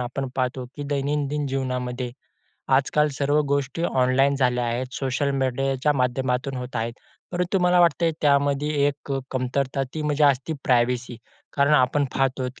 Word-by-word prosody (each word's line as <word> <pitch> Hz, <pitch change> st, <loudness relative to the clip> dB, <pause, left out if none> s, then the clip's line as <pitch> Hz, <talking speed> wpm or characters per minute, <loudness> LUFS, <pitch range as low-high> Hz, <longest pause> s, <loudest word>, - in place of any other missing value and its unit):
आपण 130 Hz, +2 st, -3 dB
पाहतो, 130 Hz, 0 st, -1 dB
की 145 Hz, -, -5 dB
दैनंदिन 145 Hz, +1 st, -1 dB
जीवनामध्ये, 125 Hz, -2 st, -3 dB, 0.7 s
आजकाल 150 Hz, +2 st, +2 dB
सर्व 145 Hz, +1 st, +2 dB
गोष्टी 140 Hz, +3 st, -1 dB
ऑनलाइन 135 Hz, -1 st, +2 dB
झाल्या 125 Hz, -2 st, +1 dB
आहेत, 120 Hz, +2 st, -2 dB
सोशल 135 Hz, +1 st, -1 dB
मीडियाच्या 135 Hz, +2 st, 0 dB
माध्यमातून 125 Hz, +1 st, -1 dB
होत 125 Hz, 0 st, -5 dB
आहेत. 115 Hz, +1 st, -2 dB, 0.4 s
परंतु 180 Hz, +2 st, 0 dB
मला 180 Hz, 0 st, +4 dB
वाटतंय, 170 Hz, 0 st, +3 dB
त्यामध्ये 140 Hz, 0 st, +2 dB, 0.2 s
एक 145 Hz, 0 st, -3 dB
अ, 135 Hz, -, 0 dB
कमतरता 130 Hz, +1 st, -1 dB
ती 155 Hz, -, -3 dB
म्हणजे 150 Hz, 0 st, +2 dB
असते 140 Hz, +2 st, +2 dB
प्रायव्हसी. 120 Hz, -1 st, +1 dB, 0.4 s
कारण 140 Hz, +2 st, +4 dB
आपण 140 Hz, +2 st, +3 dB
पाहत 135 Hz, -1 st, 0 dB
आहोत 125 Hz, 0 st, -5 dB
135 Hz, 150 wpm, -24 LUFS, 125-145 Hz, 0.7 s, मला